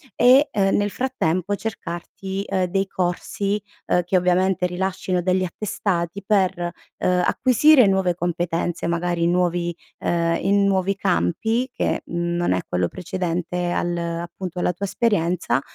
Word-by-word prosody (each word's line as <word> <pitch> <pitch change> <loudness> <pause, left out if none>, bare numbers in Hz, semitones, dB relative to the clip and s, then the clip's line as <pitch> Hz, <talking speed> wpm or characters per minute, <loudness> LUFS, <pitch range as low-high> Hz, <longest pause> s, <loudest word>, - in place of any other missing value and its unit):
e, 260 +5 +6
ehm, 195 -2 +2
nel 205 0 +1
frattempo 200 -7 -1
cercarti, 195 -1 -5
ehm, 185 -1 +1
dei 195 +2 -1
corsi, 195 +3 -2 0.2
ehm, 180 - +2
che 180 +2 +1
ovviamente 180 0 +2
rilascino 180 0 -1
degli 185 +1 +1
attestati 185 -1 -2
per, 185 -4 +1 0.3
ehm, 180 0 +2
acquisire 260 - +5
nuove 190 -3 +2
competenze, 175 -1 -2
magari 170 0 0
nuovi 175 -1 +1 0.2
ehm, 170 -1 +1
in 200 +1 +3
nuovi 195 0 +1
campi 220 - 0
che, - - -1
mhmm, 170 0 -2
non 175 - +1
è 90 - 0
quello 90 -1 0
precedente 180 - -3
al 175 0 -1
appunto 170 +1 -4
alla 175 - +1
tua 195 +4 -4
esperienza 180 - +1
180 Hz, 135 wpm, -22 LUFS, 175-195 Hz, 0.3 s, e